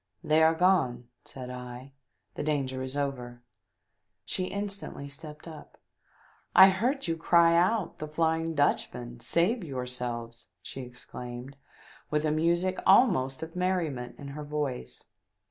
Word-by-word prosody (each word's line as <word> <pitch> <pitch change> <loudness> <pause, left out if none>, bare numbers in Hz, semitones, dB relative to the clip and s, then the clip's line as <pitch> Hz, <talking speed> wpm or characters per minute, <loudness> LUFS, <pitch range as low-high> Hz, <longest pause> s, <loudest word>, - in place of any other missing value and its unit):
"They 155 +1 +3
are 160 +1 +5
gone," 160 -10 +2 0.2
said 125 -1 -8
I, 125 +2 -8 0.4
"the - - -5
danger 135 -4 -1
is 130 +2 -4
over." 125 -4 -4 0.8
She 185 - -2
instantly 200 -7 -4
stepped 150 +3 -10
up. 160 -2 -11 0.4
" - - -32
I - - +7
heard 245 +8 0
you 165 - 0
cry 170 0 +4
out 185 +2 +1
'The 155 - -4
Flying 160 +1 0
Dutch 145 0 +2
man! 120 -1 -8
Save 175 - +1
yourselves 125 -4 -4
!' - - -54
" - - -52
she 135 - -7
exclaimed, 125 +1 -8 0.5
with 150 0 0
a 155 - +2
music 170 +4 +1
almost 175 - +4
of 160 +1 -8
merriment 170 -9 -1
in 140 - -8
her 150 +2 -6
voice. 145 - -4
150 Hz, 145 wpm, -29 LUFS, 125-170 Hz, 0.8 s, I